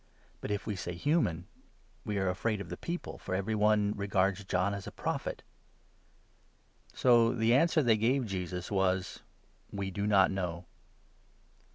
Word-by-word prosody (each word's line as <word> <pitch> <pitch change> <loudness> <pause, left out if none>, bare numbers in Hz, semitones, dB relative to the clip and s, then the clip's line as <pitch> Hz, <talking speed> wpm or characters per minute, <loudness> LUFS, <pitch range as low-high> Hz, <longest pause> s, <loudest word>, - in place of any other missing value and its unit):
But - - -6
if 105 -1 -2
we 105 - -2
say 90 -1 -5
'human,' 90 - 0 0.6
we 105 -1 -2
are 95 -1 0
afraid 105 +4 -1
of 95 -4 -7
the 90 - -4
26 - - -16
people, 175 +1 -4
for 95 - -3
every 100 +3 -1
one 105 -1 +3
regards 100 0 0
John 95 +2 0
as 100 -1 -6
a - - -6
Prophet." - - -4 1.5
So 120 -2 +4
the 115 0 +3
answer 155 +3 +4
they 115 -3 +4
gave 125 +4 +1
Jesus 90 -2 -4
was 95 -1 0 0.2
— - - -36
" - - -35
We 100 -1 -3
do 100 +2 -2
not 100 -3 +5
know." 90 -2 -3
100 Hz, 170 wpm, -31 LUFS, 95-110 Hz, 1.5 s, not